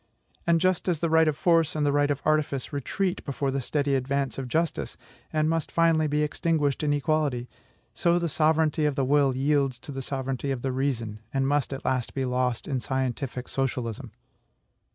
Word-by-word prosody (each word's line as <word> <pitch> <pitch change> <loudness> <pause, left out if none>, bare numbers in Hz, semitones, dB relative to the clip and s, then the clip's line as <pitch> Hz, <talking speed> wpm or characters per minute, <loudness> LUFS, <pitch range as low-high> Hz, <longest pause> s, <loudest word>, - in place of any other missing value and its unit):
And 170 -1 +4
just 185 +1 +1
as 175 -3 +2
the 165 +1 -1
right 160 0 +5
of 150 -2 0
force 165 -3 +3
and 150 -1 +1
the 145 - +3
right 145 0 +2
of 145 -1 -2
artifice 155 -2 0
retreat 180 +7 -2
before 140 -1 -2
the 135 0 -1
steady 140 +2 0
advance 135 +1 -1
of 130 - -4
justice, 160 +5 -1 0.3
and 155 0 +1
must 165 -1 -1
finally 165 -2 +3
be 150 +1 +1
extinguished 150 -2 0
in 150 -1 +1
equality, 145 -4 0 0.5
so 170 0 +2
the 170 -1 0
sovereignty 155 0 +2
of 145 -2 +1
the 135 -2 +1
will 140 -1 +3
yields 135 -1 +1
to - - -8
the 135 -1 -4
sovereignty 135 0 -3
of 130 -3 -2
the 135 - 0
reason, 120 -5 -2
and 135 -1 0
must 145 -2 +1
at 135 - -6
last 130 -2 -1
be 135 -1 0
lost 125 -1 -1
in 135 -3 -1
scientific 130 0 -3
socialism. 125 -2 -3
140 Hz, 195 wpm, -26 LUFS, 130-155 Hz, 0.5 s, right